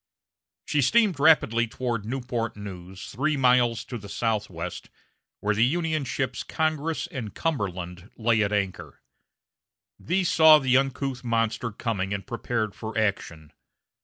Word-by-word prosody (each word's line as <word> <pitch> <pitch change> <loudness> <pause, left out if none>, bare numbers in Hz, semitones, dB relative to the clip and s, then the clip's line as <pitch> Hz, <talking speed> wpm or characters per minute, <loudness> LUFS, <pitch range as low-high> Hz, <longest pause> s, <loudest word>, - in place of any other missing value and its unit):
She 150 - +1
steamed 205 - +3
rapidly 120 -7 +4
toward 115 -2 -3
Newport 120 -3 -3
News, 95 -2 -8
three 150 +6 0
miles 125 -3 +3
to 120 - -6
the 100 -1 -11
southwest, 100 -7 -3 0.5
where 105 +1 +1
the 110 +2 +2
Union 155 +2 0
ships 130 0 -2
Congress 155 0 -1
and 125 - -7
Cumberland 95 - -3
lay 115 -1 +2
at 100 -1 +1
anchor. 100 -3 -3 1.0
These 180 +1 0
saw 160 -1 +8
the 130 -3 +2
uncouth 135 -1 0
monster 115 -1 0
coming 100 -3 -2
and 100 - -6
prepared 115 -3 -2
for 110 0 -6
action. 85 -7 -2
115 Hz, 130 wpm, -26 LUFS, 105-135 Hz, 1.0 s, saw